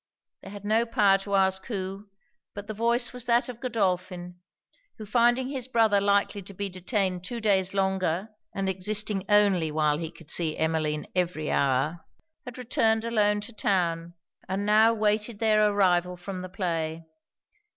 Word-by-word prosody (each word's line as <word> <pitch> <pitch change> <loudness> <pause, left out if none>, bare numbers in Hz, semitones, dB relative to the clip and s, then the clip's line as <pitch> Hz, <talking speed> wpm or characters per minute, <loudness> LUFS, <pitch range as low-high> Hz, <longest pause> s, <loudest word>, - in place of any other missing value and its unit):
They - - -11
had 205 0 -10
no 225 +3 +2
power 205 -5 +3
to 200 0 -3
ask 190 0 +2
who; 195 -2 -5 0.5
but 205 0 -7
the 215 - -5
voice 235 +3 0
was 250 -1 -7
that 240 +2 +3
of 245 -2 -8
Godolphin; 180 -6 -2 0.6
who 215 - -8
finding 240 +4 +2
his 260 -3 -4
brother 225 -5 +3
likely 200 0 +1
to 195 +1 -13
be 200 +1 -3
detained 185 -1 -2
two 235 +5 -5
days 195 -3 +1
longer, 190 0 0 0.2
and 195 0 -3
existing 195 +1 0
only 200 -6 +3
while 150 -1 +1
he 165 -2 -4
could 165 -1 -8
see 160 -3 +1
Emmeline 155 -1 -1
every 175 -4 -1
hour, 140 +5 0 0.4
had 250 -1 -9
returned 225 -2 +1
alone 210 -3 +2
to 220 +3 -8
town, 170 -5 -1 0.3
and 195 +2 -2
now 215 +2 +5
waited 215 0 0
their 215 -1 +3
arrival 180 -3 +1
from 185 +1 -7
the 185 - -7
play. 165 -4 -3
200 Hz, 160 wpm, -26 LUFS, 180-220 Hz, 0.6 s, now